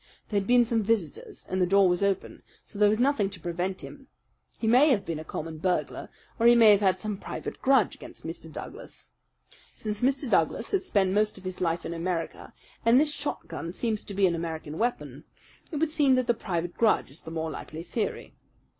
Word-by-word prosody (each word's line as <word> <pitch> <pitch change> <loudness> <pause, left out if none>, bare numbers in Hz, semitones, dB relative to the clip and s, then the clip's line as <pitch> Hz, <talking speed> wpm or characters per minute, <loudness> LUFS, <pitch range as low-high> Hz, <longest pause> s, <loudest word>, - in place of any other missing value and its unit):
There 205 - +1
had 195 - -5
been 245 -1 +5
some 230 -1 +1
visitors, 205 -7 -2
and 185 0 -1
the 180 - +3
door 195 +1 +5
was 180 +1 +1
open; 200 -1 -1 0.2
so 205 - -10
there 210 -1 +6
was 215 - +2
nothing 245 -5 +2
to 195 -3 -10
prevent 175 +2 -3
him. 270 -2 -11 0.5
He - - -4
may 250 +7 +6
have 210 -8 +2
been 165 -2 -3
a - - -6
common 160 0 -6
burglar, 180 +1 -1 0.3
or 230 - +5
he 240 - +8
may 225 -2 +8
have 205 - +5
had 190 -2 +2
some 210 0 -3
private - - -6
grudge 265 -7 +3
against - - -12
Mr. 165 0 -7
Douglas. - - -9 0.6
Since 210 -1 -4
Mr. 270 +2 +1
Douglas - - +1
has 390 -2 0
spent 190 - +2
most 210 0 +1
of 190 - -13
his 185 -1 -6
life 170 -1 0
in - - -4
America, 170 0 -4 0.3
and 230 +3 +6
this 300 0 +2
shotgun 285 - -4
seems 220 0 -2
to 200 - -7
be 195 0 +3
an 175 - +2
American 160 -2 -5
weapon, 240 +2 -2 0.5
it - - -5
would 310 +1 0
seem 290 -4 +4
that 255 -1 +1
the 240 - +3
private 175 -6 -3
grudge 220 -11 +2
is 145 - -8
the - - -9
more 160 -1 -3
likely 160 +2 -7
theory. 215 +4 -4
200 Hz, 215 wpm, -27 LUFS, 175-235 Hz, 0.6 s, he